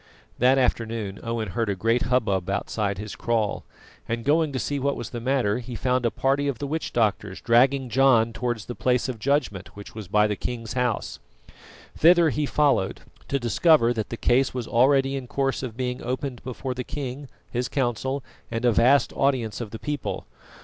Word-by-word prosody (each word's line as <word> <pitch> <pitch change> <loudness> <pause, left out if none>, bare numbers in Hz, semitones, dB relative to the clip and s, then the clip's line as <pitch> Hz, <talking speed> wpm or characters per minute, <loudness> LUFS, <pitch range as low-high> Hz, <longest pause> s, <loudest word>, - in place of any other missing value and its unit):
That 130 +2 +5
afternoon 115 -5 -1
Owen 115 -3 -3
heard 110 +5 -1
a 100 - 0
great 115 +5 +1
hubbub 100 -8 +1
outside 100 0 -1
his 105 +1 -6
kraal, 115 -3 -1 0.5
and 115 0 -2
going 155 +1 +3
to 135 - -3
see 145 +2 -2
what 140 +1 0
was - - -6
the 120 - -4
matter, 125 -3 +1
he 125 0 -7
found 125 0 +1
a - - +2
party 135 +4 0
of 140 -4 -1
the 140 - -4
witch 155 +3 -3
doctors 105 -4 0
dragging 130 +3 +3
John 120 -3 +4
towards 120 -2 -3
the 120 - -5
place 125 0 +1
of 125 -4 -5
judgment, 120 -7 -1
which 100 - -10
was 105 -4 -8
by 105 +3 +3
the 105 -1 0
king's 115 0 -5
house. 125 -3 -1 0.8
Thither 170 -1 +5
he 150 +2 -1
followed 135 -11 +1 0.3
to 140 - 0
discover 120 +1 +4
that 110 -3 -3
the 115 - -5
case 130 +3 +2
was 120 -3 -3
already 135 +3 +3
in 130 -2 -5
course 135 +1 -1
of 120 -4 -6
being 125 -1 -3
opened 125 0 -4
before 130 +1 -4
the 125 0 -4
king, 135 +1 -6 0.2
his 125 0 -1
council, 130 +1 -1 0.3
and 115 +1 -2
a 120 - +5
vast 125 +6 +4
audience 125 -5 0
of 115 - -5
the 110 - -7
people. 140 -9 -4
125 Hz, 190 wpm, -25 LUFS, 115-135 Hz, 0.8 s, That